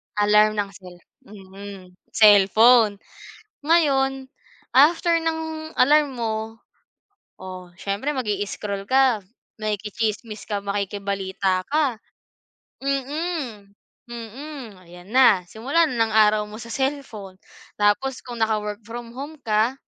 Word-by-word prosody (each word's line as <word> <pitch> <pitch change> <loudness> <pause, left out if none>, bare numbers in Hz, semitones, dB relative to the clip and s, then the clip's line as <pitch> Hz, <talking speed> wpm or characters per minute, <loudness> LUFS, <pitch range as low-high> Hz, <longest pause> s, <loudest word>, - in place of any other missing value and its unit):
Alarm 210 +1 +4
ng 205 -1 -1
cell 185 -3 -13 0.3
mm, 195 -1 -11 0.3
cellphone. 215 +2 +6 0.7
Ngayon, 270 -5 +2 0.4
after 335 +4 +4
ng 320 -1 -4
alarm 290 +1 +4
mo, 225 -3 -2 1.0
o 185 -1 -9
siyempre 200 +11 -3
mag-i-scroll 205 -3 -3
ka, 260 -4 +3 0.4
makikichismis 215 +1 -3
ka, 205 -2 -3
makikibalita 195 -2 -2
ka, 280 -6 0 0.8
mm, 275 -1 0
mm. 285 - -4 1.1
Ayan 175 +1 -14
na, 245 -7 +5
simula 280 - +1
na 270 - -4
ng 225 -1 +1
araw 215 -1 +5
mo 210 +2 -10
sa 235 0 -9
cellphone. 235 -9 -4 0.4
Tapos 220 +6 +1
kung 245 -2 -8
naka-work 210 -2 -1
from 235 0 -8
home 290 +3 -8
ka, 220 +2 +1
220 Hz, 105 wpm, -23 LUFS, 200-270 Hz, 1.1 s, cellphone